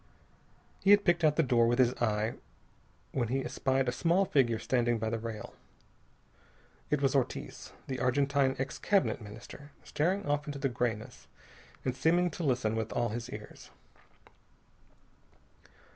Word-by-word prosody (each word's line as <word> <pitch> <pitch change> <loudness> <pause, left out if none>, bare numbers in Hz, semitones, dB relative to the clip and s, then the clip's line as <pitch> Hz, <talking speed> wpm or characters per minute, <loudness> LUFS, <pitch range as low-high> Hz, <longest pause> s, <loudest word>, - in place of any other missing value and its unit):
He 195 - 0
had 205 0 +7
picked 175 -2 +3
out 150 -1 +4
the 165 - +3
door 120 -3 +3
with 120 +1 +2
his 125 -1 +4
eye 110 -1 +1 0.8
when 120 -3 -1
he 135 +3 -1
espied 130 +1 0
a - - +2
small 170 +8 +2
figure 120 -9 +2
standing 120 0 +1
by 110 0 -2
the 115 - -1
rail. 110 -2 -6 1.4
It 150 -1 0
was 135 - +3
Ortiz, 135 -3 -2
the 130 -1 -4
Argentine 135 +1 +2
ex 135 +1 -4
Cabinet 195 - +1
Minister, 115 +7 -11
staring 185 +6 0
off 145 +1 -1
into 145 -1 -4
the 135 0 0
grayness, 120 -3 -3 0.6
and 130 -1 -1
seeming 175 +6 +2
to 170 - -5
listen 125 -6 +1
with 110 -1 -2
all 120 -1 0
his 120 +3 -5
ears. 105 -3 -10
130 Hz, 150 wpm, -31 LUFS, 120-145 Hz, 1.4 s, had